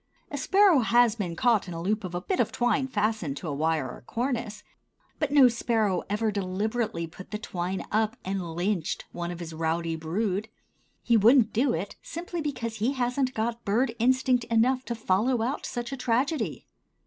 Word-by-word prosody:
A 285 - -3
sparrow 385 0 +5
has 240 -1 +4
been 180 -6 -3
caught 225 0 +2
in 180 - -6
the 165 - -5
loop 205 +5 -1
of 180 -1 -5
a 175 - -2
bit 370 - -2
of - - +2
twine 250 +2 +1
fastened 210 - -1
to 160 - -6
a 145 - -2
wire 155 -1 0
or 125 - -8
a - - -21
cornice; 230 - -3 0.6
but 300 - 0
no 280 -3 +8
sparrow 225 -5 +1
ever 215 +1 0
deliberately 200 -1 -2
put 180 +3 -12
the 210 - -3
twine 185 -2 -4
up 220 +2 +1
and 185 -4 -3
lynched 175 -1 -1
one 175 0 -4
of 175 -1 -6
his 165 -2 -7
rowdy 165 +1 -1
brood. 195 +6 -2 0.5
He 235 -1 +4
wouldn't 230 +1 +5
do 245 +4 +2
it 190 +5 -5
simply 345 0 -5
because 235 -7 -3
he 230 +6 +1
hasn't 255 0 0
got 230 +1 -2
bird 230 +4 +1
instinct 255 +1 +3
enough 240 +3 +2
to 235 - -3
follow 225 +3 +1
out 260 +5 -2
such 240 +1 -4
a 270 - -4
tragedy. 255 +6 -1
220 Hz, 190 wpm, -27 LUFS, 185-245 Hz, 0.6 s, no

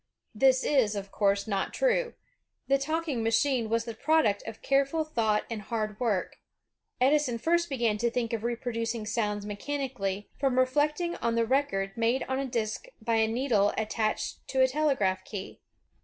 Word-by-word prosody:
This 260 +3 +4
is, 245 -8 +2
of 200 -1 -5
course, 200 -1 +1
not 195 -2 -2
true. - - +1 0.5
The 275 0 +3
talking 310 -3 -1
machine 230 +1 +1
was 230 0 0
the 230 - -5
product 230 -5 +2
of 225 -1 -8
careful 275 +3 +2
thought 225 -8 0
and 225 -2 -5
hard 215 -1 -3
work. 220 -7 -1 0.6
Edison 265 -1 +3
first 340 +7 +1
began 235 -6 0
to 235 +1 +2
think 235 -1 -2
of 225 -1 -2
reproducing 230 -1 -2
sounds 210 -1 -1
me 205 0 -4
chanically, 245 -6 -3
from 265 -2 +1
reflecting 300 +6 +1
on 230 0 -1
the 230 0 +2
record 195 -7 0
made 235 +3 +1
on 265 0 -2
a 275 - -2
disk 230 - -3
by 225 0 0
a 220 0 +3
needle 225 -3 +1
attached 215 0 -1
to 265 - +1
a 260 - +6
telegraph 255 -10 +1
key. 200 -2 -7
235 Hz, 170 wpm, -28 LUFS, 215-275 Hz, 0.6 s, a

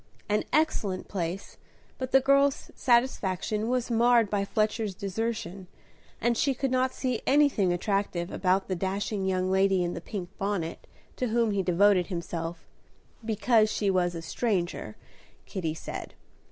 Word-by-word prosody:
An 210 0 +1
excellent 225 -12 0
place, 180 0 -4 0.4
but 260 0 -4
the 270 - +6
girl's 275 +1 +2
satisfaction 220 -4 +1
was 250 -1 0
marred 235 -2 +4
by 205 -1 +1
Fletcher's 215 0 -1
desertion, 200 -2 -4 0.5
and 235 +1 +1
she 275 +3 +1
could 265 +1 -1
not 255 0 +2
see 255 -4 -2
anything 275 -10 +4
attractive 180 -1 -1
about 190 +1 +1
the 185 - -1
dashing 195 +2 -2
young 185 0 0
lady 190 -1 +3
in 175 0 -2
the 170 - -6
pink 180 -1 -6
bonnet 195 -5 -3 0.3
to 255 - 0
whom 230 -1 +1
he 200 -1 +1
devoted 185 0 +3
himself, 170 -2 -5 0.6
"because 220 0 +2
she 200 -2 +1
was 175 -2 +1
a 165 - -6
stranger," 175 - -2 0.5
Kitty 165 -5 -3
said. - - -7
200 Hz, 145 wpm, -28 LUFS, 185-235 Hz, 0.6 s, the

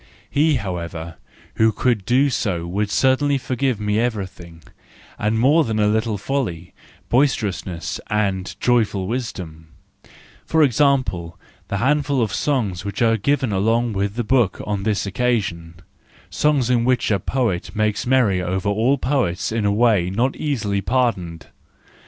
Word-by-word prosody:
He, 150 +1 +3
however, 85 -6 -5 0.4
who 110 0 +4
could 115 -4 0
do 135 +4 +3
so 90 -9 -1
would 100 +4 -2
certainly 135 +6 +2
forgive 130 -2 -1
me 105 0 0
everything, 95 -8 -4 0.6
and 105 +2 0
more 145 +8 +4
than 110 -4 -2
a 105 - +3
little 110 0 0
folly, 95 -7 -3 0.4
boisterous¬ 120 -8 +1
ness 85 -4 -5
and 100 -3 -1
"Joyful 105 -6 +1
Wisdom"—for 95 - -5
example, 125 - +1 0.3
the 100 - -2
handful 140 +3 +1
of 110 -4 0
songs 110 -12 -1
which 100 +3 -2
are 115 -1 +4
given 130 +2 0
along 115 +4 +1
with 100 +1 -2
the 120 - -1
book 115 -4 +1
on 105 -2 -2
this 105 0 -1
occasion,—songs 105 - -2
in 120 -2 +2
which 125 -2 +1
a 100 - +2
poet 115 -3 -2
makes 105 +1 0
merry 120 -8 +3
over 95 +2 -1
all 115 +7 +2
poets 125 -11 -1
in 110 -2 -1
a 100 - +3
way 105 -5 +3
not 120 +8 0
easily 105 -9 -1
pardoned. 95 -10 -1
110 Hz, 140 wpm, -21 LUFS, 95-125 Hz, 0.6 s, who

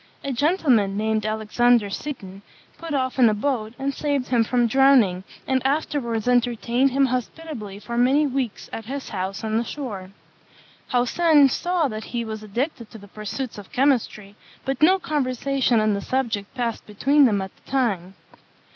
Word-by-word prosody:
A 275 - -2
gentleman, 250 - +2
named 215 0 0
Alexander 220 0 +2
Seton, 195 -8 -6 0.4
put 330 -1 -7
off 260 -1 -1
in 240 -3 +7
a 215 - 0
boat, 220 -2 -2
and 275 +1 -2
saved 285 -2 -2
him 240 -3 +3
from 240 +1 +1
drowning, 235 -7 +4 0.2
and 260 -1 0
afterwards 265 -5 -1
entertained 245 +1 +2
him 275 +1 +2
hospitably 250 -4 -4
for 235 +3 -7
many 270 +5 +4
weeks 260 -5 -3
at 225 - -6
his 275 +3 -6
house 190 0 -4
on 220 0 0
the - - -1
shore. 215 -8 -6 0.8
Haussen 285 +4 +4
saw 350 +2 0
that 215 -3 -6
he 235 -1 -3
was 220 -1 -6
addicted 235 +3 -4
to - - -11
the 205 -1 -14
pursuits 215 +3 -5
of 200 - -13
chemistry, 235 -7 0 0.3
but 270 0 -2
no 365 +5 +6
conversation 270 -6 0
on 215 -1 +2
the 200 - -2
subject 230 -5 -2
passed 235 -3 -3
between 275 +8 +3
them 210 -5 +2
at 190 -1 -5
the - - -23
time. 195 -9 0
245 Hz, 165 wpm, -23 LUFS, 215-275 Hz, 0.8 s, in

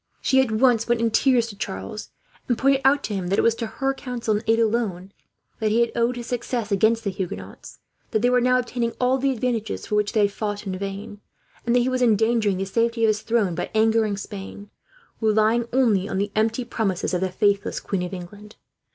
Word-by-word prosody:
She 265 0 +3
at 260 - 0
once 230 0 +3
went 240 -1 +2
in 230 0 +1
tears 245 +1 +3
to 205 - -9
Charles, 95 - -6 0.4
and 240 - +1
pointed 275 +1 +3
out 275 +2 +4
to 215 - -3
him 190 -3 -3
that 195 +3 0
it - - +3
was 230 - +4
to 230 0 -4
her 270 +4 -1
counsel 250 -4 -3
and 210 - -2
aid, 225 0 +4
alone, 215 -5 -1 0.5
that 220 -2 +1
he 225 +3 +3
had 235 - +1
owed 235 +1 +1
his 240 -1 -6
success 240 -2 -3
against 220 +3 +2
the 200 - -1
Huguenots; 100 - -7 0.3
that 220 - -1
they 245 - +4
were 250 0 +3
now 250 +1 +3
obtaining 240 -1 -2
all 255 +1 +2
the 275 +1 +1
advantages 235 -4 -2
for - - -6
which 210 0 +1
they 220 - +3
had 200 -1 +3
fought, 205 0 -4
in 190 -1 -3
vain; 200 +2 -6 0.5
and 235 - +3
that 245 - +5
he 245 - 0
was 255 0 -1
endangering 220 -3 +2
the 195 - -2
safety 230 +3 0
of 220 - +5
his 215 0 0
throne 220 -6 +1
by - - -4
angering 220 -2 +2
Spain, 205 0 -8 0.5
relying 220 +2 +2
only 220 -7 +2
on - - -2
the 200 +1 -1
empty 225 +3 0
promises 195 -7 -2
of 180 - 0
the 190 - 0
faithless 200 +2 0
Queen 195 -3 -3
of 180 - -4
England. 200 +3 -9
220 Hz, 225 wpm, -23 LUFS, 200-240 Hz, 0.5 s, that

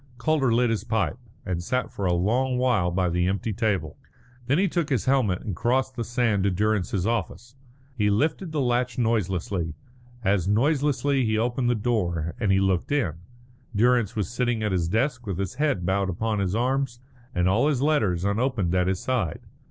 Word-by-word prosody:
Calder 135 -1 +1
lit 120 0 +3
his 110 - -1
pipe, 110 - -1 0.3
and 90 -3 -2
sat 125 +8 -2
for 100 - -2
a 90 - +2
long 125 +9 +1
while 125 -9 +2
by 90 +1 0
the 90 +1 +1
empty 100 +3 -1
table. 100 - -1 0.5
Then 140 +4 +3
he 195 +2 +3
took 170 -3 -1
his 130 -7 0
helmet 125 -9 +1
and 100 - -4
crossed 130 +4 0
the 120 - -2
sand 115 -4 0
to 100 - +3
Durrance's 100 -1 0
office. 120 +1 -3 0.4
He 105 -4 +2
lifted 155 - 0
the 150 -2 -1
latch 125 0 0
noiselessly; 95 -7 -1 0.5
as 95 -3 +1
noiselessly 140 +4 +2
he 110 -2 +1
opened 120 +2 0
the 120 - +2
door, 90 -8 -1
and 105 -4 +1
he 95 - +4
looked 95 +1 0
in. 130 - +1 0.6
Durrance 120 0 +3
was 105 -3 -1
sitting 120 -2 -1
at 105 - 0
his 90 -3 0
desk 125 - -1
with 95 -4 -2
his 95 +2 -3
head 140 - +1
bowed 95 +1 +1
upon 105 +4 -1
his 95 0 0
arms 125 +1 0 0.4
and 90 0 +2
all 110 +10 +3
his 140 -3 +1
letters 105 - +1
unopened 105 -3 0
at 90 -1 +2
his 95 0 0
side. 115 -10 -1
110 Hz, 190 wpm, -25 LUFS, 95-125 Hz, 0.6 s, he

